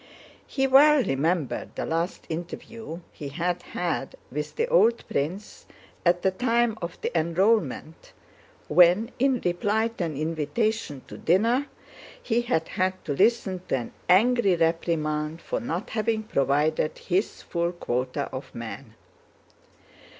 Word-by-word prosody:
He 270 -2 0
well 280 +1 +6
remembered 155 - -1
the - - -3
last 165 +3 -2
interview 175 +3 -6
he 145 - -7
had 175 +4 -2
had 175 -6 -3 0.2
with 150 +2 -4
the 465 - 0
old 235 - +3
prince 175 +9 -4 0.4
at 175 0 +2
the 190 - +3
time 235 +2 +1
of 170 0 -5
the - - -3
enrollment, 170 - 0 0.6
when 180 - +5
in 265 -1 +3
reply 205 +6 +1
to 225 -6 -3
an 155 -4 -4
invitation 160 - -1
to - - -10
dinner 230 - +2 0.5
he 235 0 0
had 200 -10 0
had 185 0 -1
to 145 - -1
listen 195 +1 +2
to - - +1
an 120 - -6 0.2
angry 210 +1 +5
reprimand 160 -2 0
for - - -3
not 175 +5 -4
having 220 0 0
provided 150 - +1
his 190 +3 -1
full 170 0 -1
quota 125 -7 -2
of - - -7
men. - - -8
175 Hz, 135 wpm, -26 LUFS, 160-225 Hz, 0.6 s, well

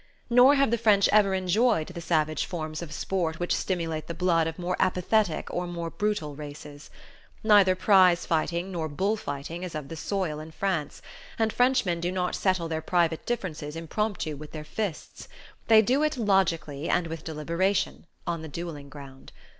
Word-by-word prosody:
Nor 250 +4 +7
have 275 -4 +3
the 235 - +1
French 210 -3 +4
ever 200 -2 +4
enjoyed 190 0 +2
the 175 -1 -7
savage 155 -3 0
forms 155 -3 -5
of 170 -3 -7
sport 165 0 -2
which 175 - 0
stimulate 165 -4 -2
the 170 - -5
blood 170 -2 +2
of 165 - -5
more 180 0 -2
apathetic 185 0 +1
or 180 0 -2
more 170 -1 -5
brutal 205 -9 -2
races. 145 0 -10 0.5
Neither 205 -4 +6
prize 185 -2 +5
fighting 170 +3 -1
nor 165 -3 -3
bull 195 +9 0
fighting 150 -2 -6
is 180 -3 -6
of 150 -2 -5
the 165 - -6
soil 165 -2 -2
in 155 +1 -8
France, 165 -4 -2 0.3
and 220 -1 +1
Frenchmen 245 -9 +2
do 175 +1 -1
not 180 -1 -1
settle 185 -3 0
their 160 -1 -3
private 170 -2 0
differences 160 -10 -3
impromptu 165 -1 -2
with 150 +1 -11
their 155 -1 -6
fists: 195 +1 -5 0.4
they 220 -1 +7
do 255 +6 +2
it, 305 -2 0
logically 170 - 0
and 175 -1 +2
with 165 -1 -6
deliberation, 170 +5 -1 0.2
on 170 -2 -2
the 160 - -7
duelling 150 -2 -7
ground. 140 -2 -12
175 Hz, 175 wpm, -27 LUFS, 155-195 Hz, 0.5 s, Nor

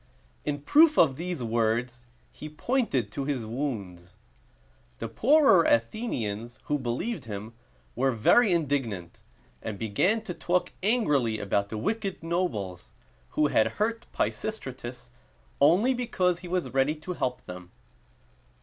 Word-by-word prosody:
In 145 -1 -2
proof 305 - +5
of 140 -6 +5
these 170 -3 -4
words, 120 +2 -1 0.3
he 155 - -9
pointed 150 - -1
to 135 +4 -3
his 135 -5 -2
wounds. 105 -8 -5 0.8
The 115 - -4
poorer 230 - +5
Athenians, 115 - -1
who 145 0 -1
believed 130 - -3
him, 105 +1 -6 0.4
were 135 +3 +2
very 190 - +4
indignant, 135 - -1 0.4
and 110 -2 -5
began 175 - +1
to 185 - -5
talk 180 +1 0
angrily 150 - +2
about 100 0 0
the 110 - -4
wicked 195 - -2
nobles, 135 - -2 0.5
who 150 - +4
had 110 -6 +2
hurt 225 +2 -1
Pisistratus 130 - -4 0.5
only 215 +10 +5
because 185 -8 0
he 180 - -9
was 180 -4 -2
ready 135 +3 +2
to 160 +4 -6
help 125 -7 -3
them. 90 0 -9
140 Hz, 130 wpm, -27 LUFS, 115-185 Hz, 0.8 s, proof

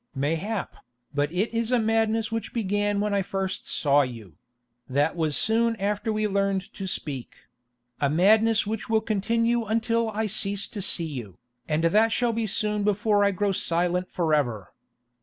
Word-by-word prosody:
"Mayhap, 165 +10 -2 0.4
but 145 +1 0
it 195 +7 -1
is 230 +1 -1
a 250 - +4
madness 225 0 +1
which 225 0 -4
began 205 -2 0
when 205 -1 +1
first 190 0 -3
I - - -9
saw 145 -1 +3
you—that 120 - -4
was 160 -3 +1
soon 230 +1 +2
after 210 +2 -1
we 215 0 0
learned 195 -1 -1
to 195 - -6
speak—a 125 -3 -6
madness 215 +8 +4
which 215 +1 -4
will 220 -1 +3
continue 230 +2 0
until 230 +1 0
I 220 +1 -2
cease 200 -1 0
to 205 - -6
see 175 -3 +2
you, 120 - -7 0.3
and 155 +1 0
that 215 +7 +4
shall 240 0 +1
be 225 -1 -1
soon 210 0 0
before 205 0 +2
I 200 - +4
grow 200 +1 0
silent 180 0 0
forever. 145 - -1
200 Hz, 160 wpm, -25 LUFS, 150-220 Hz, 0.4 s, a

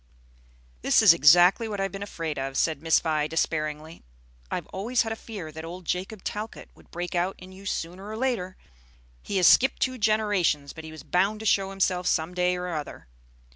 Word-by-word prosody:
"This - - +4
is - - +9
exactly 175 - +5
what 205 -2 -4
I - - +1
have 195 - -2
been 195 - -7
afraid 165 -7 -4
of," 135 0 -4
said 160 -3 0
Miss 165 0 +4
Vi, 155 -2 0
despairingly. 155 0 -2 0.5
"I've - - -3
always 230 +6 0
had 225 - -4
a - - -2
fear 200 -9 -8
that 160 +1 -8
old 175 +2 -8
Jacob 185 +4 -3
Talcott 215 +2 -6
would - - -21
break 175 0 -5
out 180 +2 0
in 185 +1 -13
you 195 +1 -11
sooner 185 +4 -4
or 220 - -5
later. 225 -8 -2 0.6
He 200 - -3
has 180 - +5
skipped 265 - +5
two 255 -1 -1
generations, 205 -9 +1
but 160 -1 -10
he 160 - -9
was 160 - -11
bound 195 +4 +1
to - - -7
show 195 -2 +2
himself 185 -2 0
some 160 +2 0
day 180 0 +1
or 180 0 -4
other. 150 - -7
180 Hz, 205 wpm, -26 LUFS, 160-205 Hz, 0.6 s, is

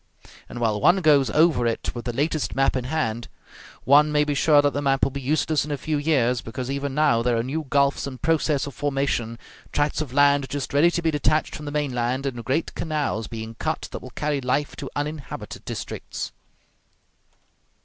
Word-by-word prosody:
And 120 - -8
while 110 -3 0
one 185 +2 +5
goes 145 -5 +4
over 155 -6 +3
it 115 - -2
with 120 -1 -7
the 120 - -1
latest 150 +5 -1
map 135 0 +2
in 130 -2 -2
hand, 120 -5 -2 0.6
one 150 +3 +5
may 150 0 +3
be 150 0 -1
sure 145 +1 +4
that 145 -1 +2
the 145 - -1
map 135 -1 +1
will 135 - +3
be 140 +1 -5
useless 155 +2 +1
in 150 - -7
a 145 - -1
few 150 +3 -2
years, 125 -5 +2
because 125 +3 -5
even 140 -1 -3
now 150 -7 +3
there 120 0 +1
are 115 - 0
new 145 +4 -3
gulfs 140 0 +2
in 130 -2 -7
process 155 -2 +1
of 140 - -7
formation, 135 -4 -1 0.3
tracts 145 +1 0
of 145 -5 -4
land 140 0 +3
just 145 -2 -4
ready 150 +5 +5
to 170 0 -2
be 165 - +2
detached 155 +1 +1
from 150 - -7
the 145 - -4
mainland, 130 -3 -1
and 120 -4 -3
great 135 +8 -1
canals 145 -9 -2
being 110 0 -6
cut - - -2
that - - -6
will - - -9
carry 150 -2 -1
life 135 +3 -1
to - - -6
uninhabited 150 0 -5
districts. - - -5
140 Hz, 200 wpm, -24 LUFS, 125-150 Hz, 0.6 s, one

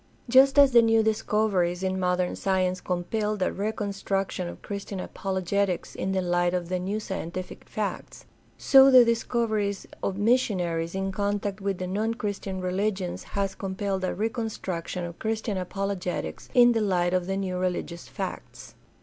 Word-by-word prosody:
Just 265 +3 +6
as 280 -1 +8
the 240 -1 +7
new 225 -1 +4
discoveries 210 -5 +1
in 190 0 -1
modern 180 0 0
science 185 -1 0
compelled 205 +3 -1
a - - 0
reconstruction 195 -3 -2
of - - -9
Christian 200 -1 -5
apologetics 190 0 -2
in 190 - -2
the 190 -1 0
light 175 0 +1
of 175 -1 -3
the 185 0 -1
new 195 +4 -2
scientific 185 -3 -6
facts, - - -4 0.3
so 270 0 +7
the 255 -2 +8
discoveries 225 -4 0 0.2
of 195 - -2
missionaries 185 -7 +1
in 195 0 -1
contact 205 +1 -2
with 195 -1 -1
the 185 - -4
non 215 +5 -1
Christian 200 -3 -4
religions 185 0 -1 0.2
has 195 -1 0
compelled 190 0 -3
a 185 - -1
reconstruction 210 -6 -3
of 170 0 -7
Chris 220 0 -1
tian 210 -4 -2
apologetics 190 0 -4
in 245 -1 +7
the 225 -1 +1
light 180 -3 +1
of 180 -1 0
the 195 0 -1
new 185 -2 -2
religious 180 -1 -3
facts. - - -7
195 Hz, 160 wpm, -26 LUFS, 180-215 Hz, 0.3 s, as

